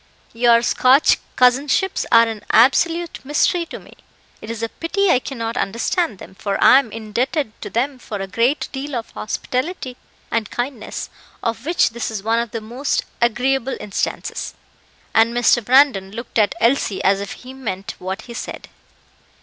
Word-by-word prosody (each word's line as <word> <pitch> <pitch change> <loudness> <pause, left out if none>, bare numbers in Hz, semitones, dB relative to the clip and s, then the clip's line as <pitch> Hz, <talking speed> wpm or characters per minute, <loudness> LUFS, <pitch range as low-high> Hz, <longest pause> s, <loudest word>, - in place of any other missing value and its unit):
Your 235 0 +4
Scotch 260 +5 +4 0.2
cousinships 270 +9 +2
are 230 0 +7
an 220 -2 -6
absolute 330 +8 +3
mystery 315 +5 +1
to - - -7
me; - - -15 0.5
it 215 - -9
is 230 0 -5
a 230 - -1
pity 385 - 0
I 250 - +4
cannot 230 -3 -5
understand 230 - -1
them, 190 - -12
for 195 +1 -3
I 265 - +8
am 245 -6 -5
indebted 225 +5 -2
to - - -6
them 260 +3 -1
for 215 -3 -6
a 195 - -3
great 235 +9 0
deal 275 +1 -5
of 230 -2 -5
hospitality 255 +4 -3 0.3
and 225 -3 -1
kindness, 245 -2 -5 0.3
of 230 +4 -3
which 345 -4 +3
this 235 0 -3
is 215 -3 -5
one 225 +2 +2
of 235 0 -2
the 225 +1 -5
most 245 +6 -2 0.2
agreeable 260 +3 +1
instances;" 200 - -3 0.6
and 230 +1 +4
Mr. 240 0 +3
Brandon 250 -5 +4
looked 230 +1 -4
at 205 -2 +2
Elsie 230 -4 +1
as 195 +1 +3
if 200 - -5
he 255 +1 -11
meant 200 -8 -5
what 190 +4 -5
he 240 - -10
said. - - -7
235 Hz, 165 wpm, -20 LUFS, 220-270 Hz, 0.6 s, I